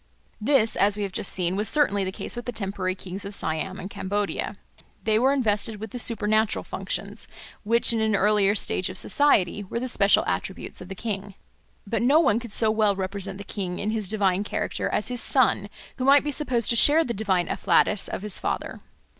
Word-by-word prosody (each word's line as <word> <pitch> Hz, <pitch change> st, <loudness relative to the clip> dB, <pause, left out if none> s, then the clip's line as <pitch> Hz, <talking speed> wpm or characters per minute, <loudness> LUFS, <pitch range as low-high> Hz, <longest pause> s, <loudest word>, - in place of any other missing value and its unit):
This, 225 Hz, -2 st, +3 dB
as 200 Hz, +1 st, +2 dB
we 210 Hz, -, -2 dB
have 195 Hz, -, -4 dB
just 205 Hz, +1 st, -1 dB
seen, 180 Hz, 0 st, -1 dB
was 210 Hz, +1 st, +2 dB
certainly 205 Hz, -10 st, +2 dB
the 190 Hz, -, -3 dB
case -, -, -6 dB
with 240 Hz, -, -6 dB
the 245 Hz, -, -3 dB
temporary 195 Hz, -4 st, -3 dB
kings 190 Hz, +1 st, -8 dB
of 200 Hz, 0 st, -2 dB
Siam 160 Hz, +3 st, -3 dB
and 190 Hz, -, -6 dB
Cambodia; 205 Hz, +1 st, -3 dB, 0.5 s
they 220 Hz, 0 st, +2 dB
were 260 Hz, +3 st, +3 dB
invested 215 Hz, -5 st, 0 dB
with 220 Hz, -1 st, -7 dB
the 245 Hz, -, -5 dB
supernatural 220 Hz, -1 st, +1 dB
functions, -, -, -5 dB, 0.3 s
which 235 Hz, +2 st, +2 dB
in 225 Hz, -, 0 dB
an 220 Hz, -1 st, +1 dB
earlier 205 Hz, 0 st, +3 dB
stage 185 Hz, -2 st, 0 dB
of 185 Hz, -, -6 dB
society 205 Hz, -9 st, +2 dB
were 200 Hz, +4 st, -4 dB
the 255 Hz, -, -3 dB
special 200 Hz, -5 st, +3 dB
attributes 190 Hz, -, -4 dB
of 180 Hz, -, -9 dB
the 195 Hz, -, -7 dB
king. 200 Hz, -2 st, -5 dB, 0.5 s
But 220 Hz, +3 st, -2 dB
no 275 Hz, +6 st, +4 dB
one 245 Hz, -9 st, +3 dB
could 235 Hz, -2 st, -8 dB
so 220 Hz, +1 st, +2 dB
well 215 Hz, -2 st, +2 dB
represent 195 Hz, 0 st, -4 dB
the 200 Hz, -, -8 dB
king 185 Hz, -3 st, -5 dB
in 210 Hz, -, -2 dB
his 215 Hz, -3 st, -2 dB
divine 200 Hz, -2 st, 0 dB
character -, -, -3 dB
as 210 Hz, -, -1 dB
his 245 Hz, -2 st, +1 dB
son, 230 Hz, -6 st, +3 dB, 0.3 s
who 255 Hz, -, -3 dB
might 280 Hz, +1 st, +6 dB
be 295 Hz, -, -2 dB
supposed 255 Hz, -6 st, -1 dB
to -, -, +1 dB
share 300 Hz, +7 st, +6 dB
the 240 Hz, -, -3 dB
divine 195 Hz, -4 st, 0 dB
afflatus 195 Hz, +2 st, +2 dB
of -, -, -5 dB
his 210 Hz, -2 st, 0 dB
father. -, -, -4 dB
210 Hz, 210 wpm, -25 LUFS, 195-230 Hz, 0.5 s, might